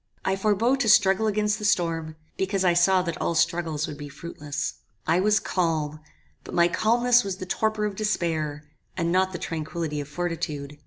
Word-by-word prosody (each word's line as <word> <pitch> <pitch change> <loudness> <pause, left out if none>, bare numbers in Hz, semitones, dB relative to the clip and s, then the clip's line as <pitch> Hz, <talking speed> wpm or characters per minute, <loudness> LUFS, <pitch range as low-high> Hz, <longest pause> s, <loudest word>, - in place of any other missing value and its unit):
I 190 - +2
forbore 215 +6 +2
to 235 -5 +2
struggle 205 0 +5
against 210 0 0
the - - -8
storm, 165 -5 0 0.2
because 190 0 0
I 175 - +5
saw 180 +2 +4
that 170 -2 -4
all 170 - 0
struggles 165 -2 +1
would 145 - -8
be 145 -1 -7
fruitless. 145 -1 -5 0.3
I 165 +3 +3
was 210 +2 +3
calm; 155 -4 -1 0.4
but - - -8
my 170 0 +5
calmness 240 +6 +3
was 195 -2 -4
the 185 - -6
torpor 215 +3 0
of 205 -2 -3
despair, 160 -8 -1 0.3
and 170 -1 0
not 185 +1 +2
the 180 - -4
tranquillity 160 -2 -4
of 145 - -8
fortitude. 150 -3 -4
175 Hz, 180 wpm, -25 LUFS, 160-205 Hz, 0.4 s, struggle